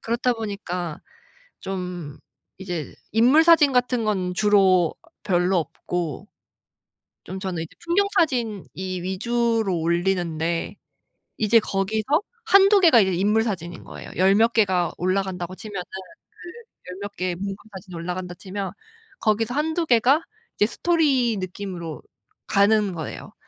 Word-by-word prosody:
그렇다 240 +2 0
보니까 180 -7 -5 0.6
좀 180 -6 -5 0.4
이제 175 -5 -5 0.2
인물 255 +9 +5
사진 325 -5 +6
같은 250 -2 +1
건 185 -4 -1
주로 190 -5 +4 0.3
별로 180 -1 +2
없고 165 -1 -4 1.0
좀 190 +3 -7
저는 185 -4 -3
이제 165 - -12
풍경 395 +4 +2
사진 235 - +1
이 185 -1 -4
위주로 225 0 0
올리는데 170 -1 -1 0.6
이제 220 +1 +4
거기서 215 - 0 0.2
1-2 395 -1 +6
개가 325 -10 +6
이제 190 -1 +1
인물 210 +5 +2
사진인 175 -6 -5
거예요. - - -10
열 190 +2 +4
몇 230 +2 +3
개가 185 -6 +2
올라간다고 185 0 -2
치면은 200 -4 -6 0.5
그 435 - -14
열 180 - -8
몇 200 0 -6
개의 180 -1 -2
풍경 195 +1 -4 0.2
사진이 185 -2 -10
올라간다 180 +1 -5
치면 195 +1 -5 0.5
거기서 220 +2 +1
1-2 320 +4 0
개가 255 +4 +4 0.4
이제 210 - +4
스토리 265 - +1
느낌으로 180 -4 -6 0.5
가는 205 -1 +3
거예요. 160 -3 -7
195 Hz, 265 characters per minute, -23 LUFS, 180-235 Hz, 1.0 s, 사진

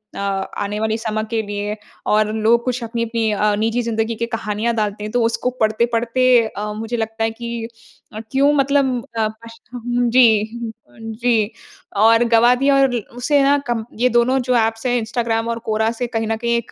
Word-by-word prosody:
अ, - - -6
आने 200 +1 -3
वाले 220 0 0
समय 220 -1 -2
के 225 -1 0
लिए? 205 0 -4 0.3
और 215 0 +2
लोग 225 +2 +2
कुछ 250 -1 -2
अपनी-अपनी 230 -1 -1
अ, 210 0 +1
निजी 225 +2 0
ज़िंदगी 225 0 -1
की 235 - -2
कहानियाँ 225 0 -2
डालते 210 -1 -2
हैं, 210 - -5
तो 245 0 +1
उसको 230 +2 0
पढ़ते-पढ़ते 235 +2 +1 0.2
अ, 210 0 -5
मुझे 225 +3 -4
लगता 225 0 -3
है 225 - +1
कि 235 0 -5 0.5
अ, 215 - -6
क्यों 275 +2 +4
मतलब 275 -2 +2 0.2
अ, 220 -1 +2 0.2
पशठम 240 +1 -3
जी 245 0 +6 0.6
अ, - - -23
जी। 225 -1 0 0.5
और 230 +1 +6
गवा 235 +2 +6
दिया 275 +2 +2
और 265 -2 +2 0.2
उसे 280 +4 +2
ना 280 +1 +4
कम 235 -2 -1 0.2
ये 250 - +4
दोनों 245 +2 +2
जो 250 0 0
ऐप्स 225 +1 0
है 245 -1 +2
इंस्टाग्राम 230 0 -1
और 230 - -2
क्वोरा 220 0 +1
से 240 +1 -3
कहीं 225 -2 -2
न 225 - 0
कहीं 235 +1 0
एक 235 - -6
230 Hz, 190 wpm, -19 LUFS, 220-245 Hz, 0.6 s, जी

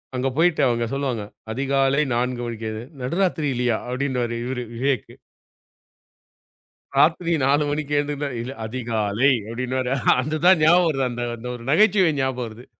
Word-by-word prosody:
அங்க 130 +1 0
போய்ட்டு 165 -2 +3
அவங்க 120 -1 0
சொல்லுவாங்க, 135 -6 -2 0.3
"அதிகாலை 135 +3 +1
4 125 0 -1
மணிக்கு 115 -1 -5
எழுந்து", 110 +1 -6 0.2
"நடுராத்திரிலயா?" 135 - 0
அப்படீன்னுவாரு 125 -2 -2
இவரு 125 0 -3
விவேக்கு. 130 -1 -1 1.8
"ராத்திரி 165 +4 +3
4 145 +2 +3
மணிக்கு 150 0 -2
எழுந்துருந்தா?", 145 0 -1
"இல்ல, 125 - -5
அதிகாலை." 115 +1 0 0.2
அப்படீன்னுவாரு. 125 +2 -2 0.3
அதுதான் 155 +5 +3
ஞாபகம் 175 +2 +5
வருது. 135 -2 -1
அந்த 120 0 -4
அந்த 115 +2 -8
ஒரு 115 - -10
நகைச்சுவை 190 0 +4
ஞாபகம் 130 -2 -1
வருது. 115 +3 -12
130 Hz, 130 wpm, -23 LUFS, 120-150 Hz, 1.8 s, ஞாபகம்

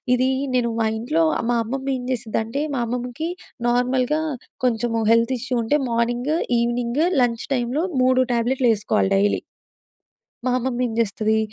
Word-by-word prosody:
ఇది 255 +1 +2 0.3
నేను 240 -1 +2
మా 225 - +2
ఇంట్లో 310 +8 +1 0.3
మా 240 - +2
అమ్మమ్మ 265 +4 -4
ఏం 250 - -7
చేసిందంటే, 230 +2 -2
మా 250 - -1
అమ్మమ్మకి 250 +7 -3 0.4
నార్మల్‍గా 255 +4 +1 0.4
కొంచెం 240 -1 +1 0.2
హెల్త్ 230 +2 +3
ఇష్యూ 255 +1 -2
ఉంటే 260 +7 +2
మార్నింగ్, 240 +5 0 0.3
ఈవినింగ్ 240 +4 0 0.2
లంచ్ 230 -1 -1
టైంలో 250 +6 -1 0.2
3 255 0 +4
ట్యాబ్లెట్లు 245 +2 +1
వేసుకోవాలి 205 -1 0
డైలీ. 205 +1 +2 1.0
మా 255 - +2
అమ్మమ్మ 250 0 -2
ఏం - - -5
చేస్తది, 220 0 +1
245 Hz, 140 wpm, -22 LUFS, 230-255 Hz, 1.0 s, 3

